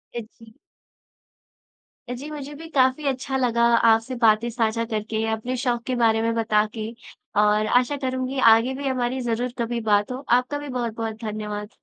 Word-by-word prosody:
अ, - - -1 0.2
जी। 225 -1 -16 1.6
जी, 250 +4 -6
मुझे 295 -1 -7
भी 325 +3 -9
काफी 260 +2 +3
अच्छा 265 0 -1
लगा 235 -2 +1
आपसे 230 +2 +3
बातें 220 +2 +4
साझा 230 -1 0
करके, 220 0 -2
अपने 220 +3 -3
शौक़ 240 -2 -1
के 255 - 0
बारे 225 -2 +3
में 230 0 0
बता 215 -2 +2
के। 220 -1 -4 0.5
और 210 0 +3
आशा 270 +3 -2
करूँगी 260 0 -2
आगे 235 +4 +2
भी 275 0 -4
हमारी 255 0 -1
ज़रूर 240 +1 -1
कभी 235 0 -1
बात 210 +1 +2
हो। 260 +2 -5
आपका 255 +4 -2
भी 290 0 -7
बहुत-बहुत 230 -3 -4
धन्यवाद। 210 -1 -4
235 Hz, 165 wpm, -23 LUFS, 220-255 Hz, 1.6 s, बातें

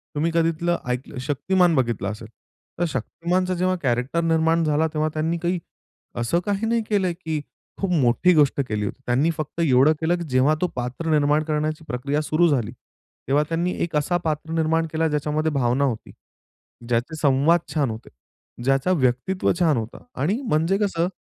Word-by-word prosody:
तुम्ही 165 +3 0
कधी 165 0 +3
इथलं 170 +1 -1
ऐकलं 125 +2 -4
शक्तिमान 175 +4 +2
बघितलं 120 -7 0
असेल, 110 +1 -9 0.5
तर 175 - +2
शक्तिमानचा 175 +8 -1
जेव्हा 185 +1 +1
कॅरेक्टर 125 +6 0
निर्माण 165 0 +2
झाला 155 +1 +2
तेव्हा, 155 0 0
त्यांनी 160 +2 -1
काही 175 +1 -1 0.6
असं 120 +9 +1
काही 205 +2 -1
नाही 230 0 +1
केलं 195 -4 +1
की 160 -1 -1 0.4
खूप 195 -2 0
मोठी 150 +4 +3
गोष्ट 145 -2 +3
केली 105 -1 -2
होती. 135 - -6
त्यांनी 130 +7 +2
फक्त 155 +2 -5
एवढं 140 0 +5
केलं, 170 +2 +2
की 170 - -4
जेव्हा 130 +4 +3
तो 180 - +2
पात्र 125 +6 -3
निर्माण 150 0 +3
करण्याची 155 0 -2
प्रक्रिया 140 +5 -1
सुरू 155 +3 +2
झाली, 130 -9 0 0.6
तेव्हा 145 +2 +3
त्यांनी 170 +2 0
एक 170 -2 -3
असा 150 +4 +1
पात्र 155 +1 -2
निर्माण 165 0 +1
केला 160 0 +1
ज्याच्यामध्ये 150 +1 0
भावना 130 0 +1
होती, 125 -5 -2 0.8
ज्याचे 120 +7 0
संवाद 145 +4 +4
छान 145 -5 +1
होते, 110 +2 -9 0.5
ज्याचा 135 +6 +2
व्यक्तित्व 135 +5 +1
छान 160 -7 +3
होतं. 110 0 -6 0.2
आणि 195 - +1
म्हणजे 170 - +1
कसं, 180 -5 0
155 Hz, 170 wpm, -23 LUFS, 135-170 Hz, 0.8 s, एवढं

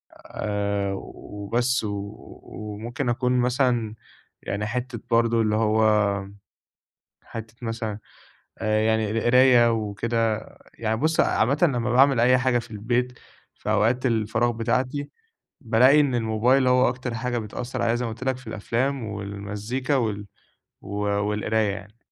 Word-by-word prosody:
آآ، 100 -1 -2
وبس 115 +7 -2
و 100 0 -4 0.3
وممكن 115 +6 -5
أكون 125 +1 +1
مثلًا 120 -3 +1 0.5
يعني 105 +1 -3
حتّة 125 0 -4
برضه 115 0 +3
اللي 105 0 +1
هو 110 0 +2 1.4
حتّة 110 0 -9
مثلًا 115 -2 -4 0.6
آآ 110 -1 +1
يعني 110 -1 +1
القراية 120 +1 +5
وكده، 110 +1 -1 0.3
يعني 110 -1 -1
بُصّ، 155 +6 +1
عامةً 135 +7 +2
لمّا 120 -7 +2
باعمل 135 -1 +5
أي 125 +2 +5
حاجة 125 -1 +2
في 120 - -8
البيت 120 +4 -2 0.4
في - - -5
أوقات 125 +4 +2
الفراغ 110 0 +1
بتاعتي، 130 +5 -1 0.5
بالاقي 125 +5 +5
إن 135 -4 +2
الموبايل 120 +4 +2
هو 125 0 +4
أكتر 125 -1 -4
حاجة 120 +1 -2
بتأثّر 120 +3 -5
عليَّ 115 0 +2
زي 125 - -2
ما 115 - -3
قُلت 120 - -8
لك 130 -1 0
في 125 - -15
الأفلام 120 +5 -2
والمزيكا 105 +5 -3
وال 105 -5 -1 0.5
و - - -12 0.2
والقراية 105 +1 0
يعني. 105 +3 -9
115 Hz, 135 wpm, -24 LUFS, 105-125 Hz, 1.4 s, القراية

